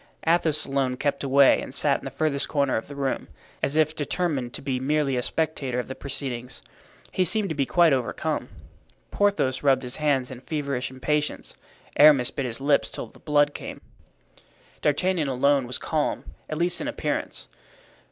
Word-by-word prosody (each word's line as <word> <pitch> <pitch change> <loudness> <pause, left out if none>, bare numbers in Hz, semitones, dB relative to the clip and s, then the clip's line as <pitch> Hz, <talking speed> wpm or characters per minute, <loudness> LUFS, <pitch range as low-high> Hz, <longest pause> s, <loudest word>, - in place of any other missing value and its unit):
Athos 160 -2 +2
alone 135 -2 -1
kept 140 +1 -1
away 140 0 +5
and 130 - -7
sat 140 -1 +2
in - - -13
the - - -3
furthest 140 +1 0
corner 140 -3 +1
of 110 - -3
the 145 - -9
room, 135 -1 -2 0.3
as 140 - 0
if 155 0 +2
determined 145 -5 -1
to - - -5
be 135 -2 -2
merely 140 0 +1
a 125 - 0
spectator 140 -3 -2
of 125 - -4
the 130 - -5
proceedings. 130 -3 -4 0.5
He 185 - +1
seemed 200 +3 +1
to - - -1
be 140 -2 0
quite 170 -4 +4
overcome. 130 -3 -2 0.6
Porthos 200 -11 +1
rubbed 135 -2 +3
his 125 +1 -4
hands 140 -4 +1
in 125 -1 -9
feverish 140 -4 -3
impatience. 150 +3 -2 0.4
Aramis 145 -5 +6
bit 140 -3 -3
his 115 0 -5
lips 140 +1 +2
till - - -5
the - - -18
blood 145 -1 +2
came. - - -7 1.0
D'Artagnan 160 +2 +1
alone 135 0 +2
was 125 - -2
calm, 155 -2 -1 0.3
at 155 - -3
least 175 +1 +1
in 290 - -3
appearance. 290 - -3
140 Hz, 175 wpm, -25 LUFS, 130-155 Hz, 1.0 s, Aramis